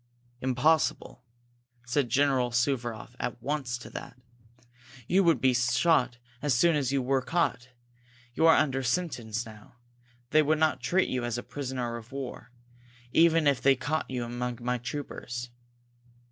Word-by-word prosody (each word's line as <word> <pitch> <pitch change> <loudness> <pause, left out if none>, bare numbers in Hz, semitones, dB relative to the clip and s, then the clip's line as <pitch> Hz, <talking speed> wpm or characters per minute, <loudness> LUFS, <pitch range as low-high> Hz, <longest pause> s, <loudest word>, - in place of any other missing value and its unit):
"Impossible!" 130 +3 +1 0.6
said 125 +1 0
General 135 -3 +2
Suvaroff 120 -2 -1
at 120 - -3
once 130 -1 -2
to 120 - -11
that. - - -8 0.9
"You 195 +2 +4
would 165 -7 +3
be 130 +1 +3
shot 125 +1 +2 0.2
as 145 -4 +1
soon 165 +7 +4
as 135 -3 0
you 135 -2 +1
were 135 +1 +1
caught 130 -5 -1 0.6
you 160 +6 +3
are 160 - +7
under 135 -2 +1
sentence 120 -5 -2
now. 110 +1 -14 0.6
They 155 - +6
would 155 +1 +2
not 155 0 +2
treat 185 +1 +2
you 125 -1 -2
as 120 -1 -2
a 120 - -5
prisoner 125 -4 -4
of 115 +2 -12
war, 135 -2 -6 0.6
even 165 0 +4
if 140 -3 +3
they 135 0 +5
caught 145 +5 -2
you 125 -2 -3
among 120 0 -4
my 125 +1 -1
troopers." 120 -2 -6
130 Hz, 150 wpm, -28 LUFS, 120-150 Hz, 0.9 s, are